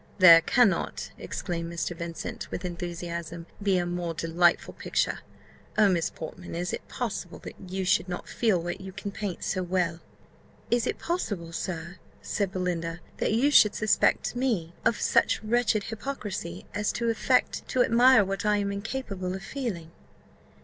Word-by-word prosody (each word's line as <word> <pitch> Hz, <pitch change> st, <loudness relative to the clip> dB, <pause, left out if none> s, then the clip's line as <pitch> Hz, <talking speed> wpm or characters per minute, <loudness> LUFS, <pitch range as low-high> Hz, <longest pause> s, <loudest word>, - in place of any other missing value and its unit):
"There 170 Hz, -4 st, +10 dB
cannot," 225 Hz, +4 st, +2 dB
exclaimed 170 Hz, -2 st, -4 dB
Mr. 170 Hz, +1 st, -3 dB
Vincent, 170 Hz, 0 st, -6 dB
with -, -, -5 dB
enthusiasm, 170 Hz, -1 st, -5 dB, 0.2 s
"be 195 Hz, -2 st, +2 dB
a 175 Hz, -, +1 dB
more 175 Hz, -1 st, -3 dB
delightful 165 Hz, +2 st, +2 dB
picture! -, -, -1 dB, 0.6 s
Oh, 210 Hz, -2 st, +6 dB
Miss 170 Hz, -3 st, +1 dB
Portman, 170 Hz, +2 st, -8 dB
is 175 Hz, +1 st, -2 dB
it -, -, -5 dB
possible -, -, -4 dB
that -, -, -7 dB, 0.2 s
you 190 Hz, 0 st, -2 dB
should 180 Hz, 0 st, +2 dB
not 175 Hz, -, -5 dB
feel 215 Hz, -7 st, +2 dB
what 175 Hz, +2 st, -4 dB
you 190 Hz, 0 st, -8 dB
can 200 Hz, -, -5 dB
paint 200 Hz, -3 st, -4 dB
so 185 Hz, -, -1 dB
well?" 175 Hz, -2 st, 0 dB, 0.7 s
"Is 240 Hz, -1 st, +2 dB
it -, -, -1 dB
possible, 205 Hz, -, -3 dB
sir," 170 Hz, +1 st, -5 dB, 0.2 s
said 200 Hz, -3 st, -2 dB
Belinda, 175 Hz, -3 st, -2 dB, 0.2 s
"that -, -, 0 dB
you 265 Hz, +6 st, +3 dB
should 210 Hz, -7 st, +6 dB
suspect 215 Hz, +2 st, +2 dB
me 220 Hz, -10 st, 0 dB
of 230 Hz, -, +3 dB
such -, -, +2 dB
wretched 220 Hz, -2 st, +2 dB
hypocrisy, 210 Hz, -, -5 dB
as 210 Hz, 0 st, 0 dB
to 235 Hz, -1 st, 0 dB
affect 225 Hz, -, +1 dB
to 255 Hz, -, +3 dB
admire 240 Hz, -2 st, +6 dB
what 195 Hz, +1 st, -3 dB
I 210 Hz, 0 st, +3 dB
am 200 Hz, -1 st, -1 dB
incapable 200 Hz, -3 st, -4 dB
of 190 Hz, -, -7 dB
feeling?" 215 Hz, -, -4 dB
185 Hz, 160 wpm, -27 LUFS, 170-215 Hz, 0.7 s, There